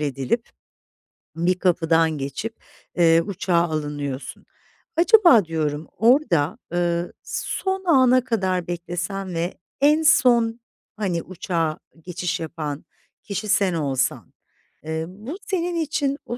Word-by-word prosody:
edilip 145 - -2 0.9
bir 180 +2 +1
kapıdan 165 -3 +2
geçip, 140 +12 -5 0.4
eee, 165 -1 +5
uçağa 180 0 -2
alınıyorsun. 150 -4 -3 0.5
Acaba 345 - +6
diyorum, 155 -1 -2
orada, 220 - +3 0.2
ııı, 175 0 0
son 380 0 -3
ana 255 -5 +5
kadar 190 -7 -1
beklesen 175 +2 -4
ve 170 +2 -2 0.3
en 300 +2 +5
son, 235 -6 +4 0.4
hani, 180 -5 -1
uçağa 165 -3 -2 0.2
geçiş 180 +1 -3
yapan 155 -3 -5 0.4
kişi 205 +1 -4
sen 200 -3 +2
olsan, 135 -5 -1 0.5
eee, 160 +1 -3
bu 215 - -8
senin 355 -3 -1
için 290 -3 -1
o 240 - -5
180 Hz, 110 wpm, -23 LUFS, 165-235 Hz, 0.9 s, Acaba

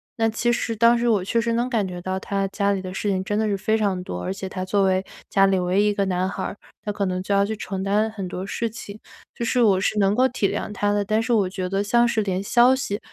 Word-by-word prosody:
那 225 -1 +1
其 235 +2 0
实 230 - -1
当 235 +2 +5
时 240 0 +1
我 205 -5 +2
确 230 +5 0
实 230 0 -1
能 240 +2 0
感 225 -5 0
觉 180 -1 -6
到 185 +1 -3
他 195 0 -2
家 200 0 0
里 195 -1 -1
的 185 -1 -7
事 205 +1 -2
情 190 -1 0
真 205 +2 -2
的 220 - +1
是 200 -1 0
非 220 +3 +1
常 195 -4 0
多， 90 - -5
而 190 - -2
且 195 0 -6
他 185 0 -5
作 195 +1 +1
为 190 0 +2 0.3
家 195 -1 +4
里 195 -1 +2
唯 180 +3 +1
一 - - +3
一 205 - +2
个 200 -1 0
男 185 0 0
孩 - - -4
儿， - - -4 0.3
他 210 - -3
可 200 -1 -2
能 185 0 -2
就 200 - -1
要 200 0 +3
去 220 +1 -3
承 195 -2 -4
担 210 +3 +1
很 195 -4 -5
多 185 +1 -5
事 230 +3 -2
情， 215 -1 -9 0.3
就 235 - -5
是 245 +2 +1
我 195 -5 +4
是 215 - 0
能 195 0 +3
够 260 +1 +4
体 245 -6 0
谅 - - -3
他 205 0 0
的。 205 0 +1
但 215 +2 +1
是 235 +1 0
我 200 -4 +2
觉 185 -1 -4
得 195 +2 -1
像 235 +3 +3
是 225 -2 +1
连 190 -1 -2
消 245 +4 +5
息， 210 -6 -3
200 Hz, 320 characters per minute, -23 LUFS, 190-220 Hz, 0.3 s, 当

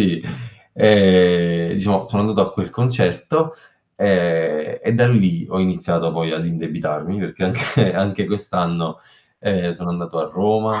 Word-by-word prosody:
Sì, 85 -5 +1 0.5
ehm, 90 -4 +4
diciamo 95 -1 0
sono 100 -1 0
andato 110 +1 +1
a - - -12
quel - - -4
concerto, 125 - 0 0.4
ehm, 85 -5 0
e 115 - 0
da 120 +1 +4
lì 95 -8 +2
ho 95 - -3
iniziato 85 -3 -1
poi 80 0 -2
ad 80 +1 -3
indebitarmi 80 +1 -4
perché 95 - -6
anche 90 - +1
anche 95 0 -1
quest'anno, 85 -5 -3 0.4
ehm, 90 -4 -1
sono 90 0 -6
andato 85 -1 -5
a 80 - -3
Roma 110 +2 0
90 Hz, 145 wpm, -19 LUFS, 85-105 Hz, 0.5 s, ehm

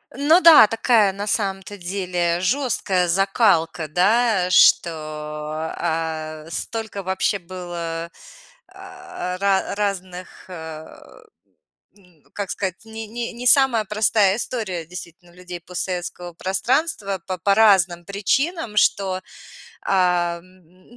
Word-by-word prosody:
Ну 310 +7 +4
да, 330 -8 +9
такая 225 -3 +2
на 205 +2 -5
самом-то 195 -1 -2
деле 175 -2 -2
жёсткая 195 -5 0
закалка, 185 -3 +1
да, 195 +3 +2
что, 175 -1 +5 0.8
а, 160 -2 -4
столько 220 +2 -4
вообще 190 +2 0
было, 170 -2 -6 0.6
а, 375 - -8
ра 195 0 0
разных, 190 -3 -5
э, 160 -2 -8 1.1
м, 180 -6 -25
как 200 -2 -5
сказать, 190 +1 -4
не 220 0 -7
не 235 +2 -5
не 240 +2 -8
самая 245 -4 +4
простая 210 -1 +2
история 205 -10 -4
действительно 175 0 -11
у - - -22
людей 180 -1 -9
постсоветского 180 0 -5
пространства 195 - -1
по 185 -1 -3
по 200 +4 +2
разным 190 -5 +4
причинам, 215 - -1
что, 190 -2 +2 0.6
а, 180 -2 +1
м, 185 +5 -22
190 Hz, 110 wpm, -21 LUFS, 175-215 Hz, 1.1 s, да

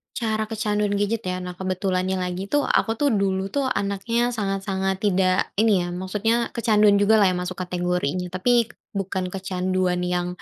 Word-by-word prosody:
Cara 220 -4 -1
kecanduan 210 -2 -1
gadget 205 +1 -1
ya? 185 0 -3
Nah 180 - -5
kebetulannya 185 0 -1
lagi 180 +2 -4
tuh 290 +7 +1
aku 225 - +1
tuh 285 +5 +1
dulu 195 0 -1
tuh 280 -2 0
anaknya 230 +2 0
sangat 195 -4 -2
sangat 190 0 -1
tidak 185 -2 +2
ini 210 -5 +4
ya - - -4
maksudnya 210 +6 0
kecanduan 215 -3 +4
jugalah 205 0 +5
yang 185 - +1
masuk 180 +1 -6
kategorinya 180 -1 -2
tapi 235 +6 +3 0.3
bukan 190 -1 -2
kecanduan 185 -1 -1
yang, 175 0 -1
195 Hz, 160 wpm, -23 LUFS, 185-215 Hz, 0.3 s, jugalah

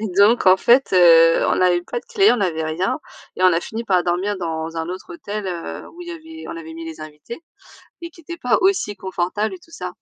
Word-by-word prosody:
Et 220 - -3
donc 210 +1 +4
en 185 +1 +7
fait, 245 +7 +3
heu, 165 -2 +6
on - - +1
avait 175 -1 +3
pas 475 - -5
de - - -30
clé, 400 0 +4
on 240 - -1
avait 165 -4 -1
rien. 160 +5 -1 0.4
Et 185 - -3
on 185 - +6
a 165 - +1
fini 225 +5 -6
par 185 -4 +2
dormir 185 +4 -1
dans 165 -2 -4
un 160 - -4
autre 185 - -7
hôtel, 215 - -6
heu, 175 -2 -6
où 345 - -15
il 345 - -9
y - - -5
avait 320 -1 -10
on 335 - -6
avait 325 0 -9
mis 330 0 -8
les 325 - -9
invités 155 - -10 0.6
et 335 - -6
qui 335 - -18
était 340 +2 -8
pas 250 -6 +1
aussi 370 - +1
confortable 190 - -3
et - - -11
tout 330 - -22
ça. - - -7
205 Hz, 250 wpm, -20 LUFS, -, 0.6 s, en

